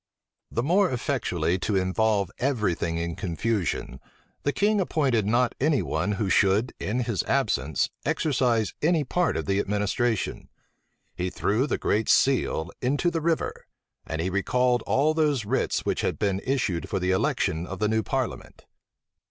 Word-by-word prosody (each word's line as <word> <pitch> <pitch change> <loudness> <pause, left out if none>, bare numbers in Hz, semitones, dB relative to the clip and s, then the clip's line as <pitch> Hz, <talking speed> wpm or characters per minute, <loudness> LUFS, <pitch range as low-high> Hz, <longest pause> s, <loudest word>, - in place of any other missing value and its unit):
The 115 - -1
more 185 +6 +3
effectually 95 - -1
to 105 +2 -1
involve 100 +1 +1
every 120 -8 +1
thing 85 0 -2
in 85 0 -3
confusion, 90 - -2 0.4
the 145 - 0
king 205 +5 +2
appointed 130 - +1
not 120 +2 +2
any 145 0 +2
one 105 - -1
who 105 0 -1
should, 100 +5 +2
in 120 +5 -1
his 110 -7 -1
absence, 70 +2 0
exercise 125 -7 +1
any 160 0 +2
part 175 +6 0
of - - -3
the 100 0 +1
administration; 105 +3 -1 0.7
he 90 +1 -2
threw 110 +8 0
the - - -1
great 110 +2 0
seal 110 -11 +2
into 145 +7 +1
the 165 - -2
river; 165 0 -1 0.4
and 80 - -3
he 90 +3 -1
recalled 125 +5 +1
all 150 +4 +3
those 150 -7 +1
writs 130 +6 0
which - - 0
had - - -1
been 100 -1 0
issued 115 -11 -1
for 100 - -1
the 90 +1 0
election 85 -2 0
of 95 - -6
the 105 - +1
new 110 +1 +1
parliament. - - -4
110 Hz, 160 wpm, -26 LUFS, 95-135 Hz, 0.7 s, more